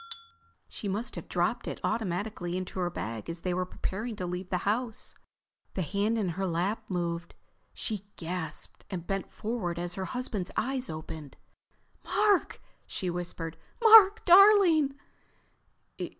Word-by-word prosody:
She 205 Hz, -, -6 dB
must 210 Hz, +5 st, -2 dB
have -, -, -7 dB
dropped -, -, 0 dB
it -, -, -4 dB
automatically 185 Hz, -3 st, -2 dB
into 185 Hz, 0 st, -5 dB
her 175 Hz, -1 st, +1 dB
bag 115 Hz, -8 st, -5 dB
as 165 Hz, 0 st, -5 dB
they 180 Hz, 0 st, -1 dB
were 180 Hz, 0 st, -1 dB
preparing 215 Hz, +5 st, -4 dB
to 185 Hz, -, -4 dB
leave 180 Hz, +1 st, -4 dB
the 180 Hz, -, +1 dB
house. 225 Hz, +2 st, -1 dB, 0.6 s
The 185 Hz, -, 0 dB
hand 200 Hz, +7 st, 0 dB
in 205 Hz, -5 st, 0 dB
her 190 Hz, +3 st, -2 dB
lap 185 Hz, +6 st, -1 dB
moved. 170 Hz, -2 st, -3 dB, 0.4 s
She 210 Hz, -3 st, -4 dB
gasped 165 Hz, -2 st, -6 dB
and 180 Hz, -4 st, -5 dB
bent 195 Hz, +1 st, -3 dB
forward 210 Hz, -6 st, -3 dB
as 175 Hz, 0 st, -2 dB
her 190 Hz, +1 st, -3 dB
husband's 220 Hz, -6 st, -3 dB
eyes 260 Hz, +2 st, -1 dB
opened. 155 Hz, -2 st, -7 dB, 0.7 s
"Mark!" 415 Hz, -3 st, +2 dB, 0.3 s
she 180 Hz, -2 st, -2 dB
whispered. 170 Hz, -2 st, -4 dB, 0.2 s
"Mark, 445 Hz, -2 st, +8 dB
darling!" 360 Hz, -7 st, +7 dB
190 Hz, 140 wpm, -29 LUFS, 175-230 Hz, 0.7 s, Mark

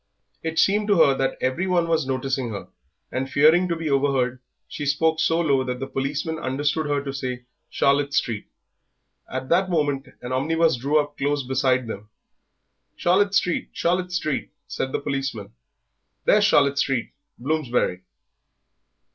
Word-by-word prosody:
It 160 Hz, 0 st, -4 dB
seemed 205 Hz, +4 st, +3 dB
to 205 Hz, -, +4 dB
her 140 Hz, -4 st, +6 dB
that 135 Hz, 0 st, -1 dB
every 130 Hz, +9 st, 0 dB
one 175 Hz, -2 st, +2 dB
was 160 Hz, -4 st, +1 dB
noticing 130 Hz, -1 st, -1 dB
her, 100 Hz, -3 st, -7 dB, 0.4 s
and 130 Hz, +1 st, -2 dB
fearing 160 Hz, +6 st, +5 dB
to 170 Hz, -, -1 dB
be 165 Hz, -1 st, -4 dB
overheard 135 Hz, -3 st, +1 dB, 0.3 s
she 150 Hz, -, -6 dB
spoke 160 Hz, +3 st, +1 dB
so 165 Hz, 0 st, +2 dB
low 140 Hz, -6 st, +2 dB
that 125 Hz, -1 st, -4 dB
the 135 Hz, -, -3 dB
policeman 145 Hz, +5 st, -3 dB
understood 145 Hz, +3 st, -1 dB
her 145 Hz, -1 st, 0 dB
to 135 Hz, -1 st, -5 dB
say 125 Hz, -2 st, -4 dB, 0.3 s
Charlotte 140 Hz, +1 st, +2 dB
Street. 115 Hz, -5 st, -1 dB, 0.8 s
At 130 Hz, 0 st, -4 dB
that 185 Hz, +2 st, +3 dB
moment 145 Hz, -5 st, 0 dB, 0.2 s
an 125 Hz, -, -5 dB
omnibus 160 Hz, +5 st, +2 dB
drew 140 Hz, +5 st, +1 dB
up 145 Hz, 0 st, -4 dB
close 145 Hz, 0 st, 0 dB
beside 130 Hz, -1 st, +1 dB
them. 105 Hz, -2 st, -7 dB, 0.9 s
"Charlotte 200 Hz, +3 st, +2 dB
Street, 180 Hz, -2 st, +1 dB
Charlotte 180 Hz, +1 st, 0 dB
Street," 155 Hz, -5 st, -2 dB, 0.2 s
said 130 Hz, -, -3 dB
the -, -, -1 dB
policeman, 135 Hz, -7 st, -4 dB, 0.7 s
"there's -, -, +5 dB
Charlotte 140 Hz, -1 st, +3 dB
Street, 135 Hz, -5 st, 0 dB, 0.3 s
Bloomsbury." 125 Hz, -9 st, -1 dB
140 Hz, 155 wpm, -23 LUFS, 130-160 Hz, 0.9 s, her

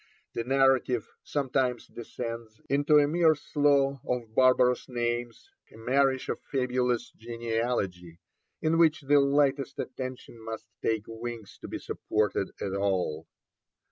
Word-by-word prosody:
The 115 Hz, -, -2 dB
narrative 130 Hz, -2 st, +2 dB, 0.2 s
sometimes 130 Hz, -3 st, -1 dB
descends 115 Hz, -2 st, -7 dB
into 145 Hz, +2 st, +4 dB
a 145 Hz, -1 st, +5 dB
mere 160 Hz, 0 st, +4 dB
slough 140 Hz, -2 st, +2 dB
of 120 Hz, -3 st, -3 dB
barbarous 125 Hz, 0 st, +4 dB
names, 120 Hz, -, -3 dB, 0.2 s
a -, -, -14 dB
marish 130 Hz, +3 st, +1 dB
of -, -, -3 dB
fabulous 125 Hz, -2 st, 0 dB
genealogy, 115 Hz, -7 st, -3 dB, 0.5 s
in 160 Hz, +1 st, +2 dB
which 160 Hz, -2 st, +4 dB
the 145 Hz, +1 st, +4 dB
lightest 140 Hz, -1 st, +2 dB
attention 130 Hz, -3 st, -6 dB
must 110 Hz, 0 st, -6 dB, 0.2 s
take 110 Hz, -2 st, 0 dB
wings 115 Hz, -2 st, -7 dB
to -, -, -7 dB
be -, -, -4 dB
supported 105 Hz, -2 st, -1 dB
at 95 Hz, -, -3 dB
all. 95 Hz, -6 st, -1 dB
125 Hz, 125 wpm, -28 LUFS, 115-140 Hz, 0.5 s, a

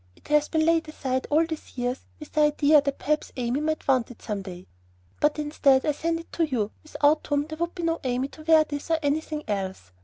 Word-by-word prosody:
It -, -, -19 dB
has 300 Hz, 0 st, +3 dB
been 315 Hz, -1 st, +2 dB
laid 330 Hz, -1 st, +2 dB
aside 260 Hz, -4 st, -2 dB
all 315 Hz, +3 st, +4 dB
these 320 Hz, -4 st, -8 dB
years 245 Hz, +1 st, -1 dB, 0.2 s
with 300 Hz, -, -10 dB
the 305 Hz, -, +2 dB
idea 300 Hz, 0 st, +5 dB
that 280 Hz, -1 st, -2 dB
perhaps 300 Hz, +1 st, -1 dB
Amy 250 Hz, +3 st, -1 dB
might 310 Hz, 0 st, -2 dB
want 255 Hz, -4 st, +2 dB
it 245 Hz, -, -12 dB
some 210 Hz, -3 st, -3 dB
day; 185 Hz, -1 st, -9 dB, 0.5 s
but 300 Hz, +1 st, +2 dB
instead 295 Hz, -3 st, +3 dB
I 300 Hz, -, +3 dB
send 330 Hz, +3 st, -1 dB
it 330 Hz, -, -12 dB
to 335 Hz, -, 0 dB
you, 240 Hz, -9 st, -1 dB
without 305 Hz, 0 st, +1 dB
whom 290 Hz, 0 st, +1 dB
there 315 Hz, 0 st, -8 dB
would 340 Hz, +1 st, -2 dB
be 350 Hz, -, -5 dB
no 330 Hz, 0 st, 0 dB
Amy 255 Hz, +1 st, 0 dB
to 310 Hz, -, -13 dB
wear 315 Hz, 0 st, +5 dB
this 290 Hz, +1 st, -6 dB
or 325 Hz, -, +3 dB
anything 300 Hz, +1 st, -1 dB
else. 190 Hz, -, -4 dB
295 Hz, 235 wpm, -26 LUFS, 260-315 Hz, 0.5 s, idea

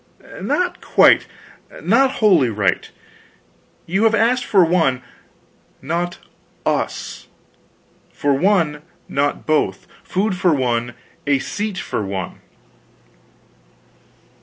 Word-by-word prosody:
"Not 360 Hz, 0 st, -1 dB
quite, -, -, +4 dB, 0.5 s
not 270 Hz, 0 st, +3 dB
wholly 180 Hz, -, +4 dB
right. 105 Hz, -3 st, 0 dB, 1.0 s
You 195 Hz, +6 st, +1 dB
have 225 Hz, 0 st, +4 dB
asked 245 Hz, +3 st, +2 dB
for 190 Hz, -4 st, +4 dB
one, 160 Hz, -7 st, +1 dB, 0.8 s
not 170 Hz, +5 st, -3 dB, 0.5 s
us -, -, -2 dB, 0.8 s
for 145 Hz, -1 st, 0 dB
one, 160 Hz, -2 st, +1 dB, 0.3 s
not 145 Hz, +1 st, -1 dB
both; 155 Hz, -1 st, 0 dB, 0.2 s
food 195 Hz, +1 st, -1 dB
for 180 Hz, -3 st, +2 dB
one, 120 Hz, -2 st, -1 dB, 0.3 s
a 140 Hz, -1 st, +4 dB
seat 205 Hz, +7 st, -4 dB
for 105 Hz, -, -3 dB
one." 95 Hz, -1 st, -5 dB
170 Hz, 95 wpm, -20 LUFS, 135-205 Hz, 1.0 s, quite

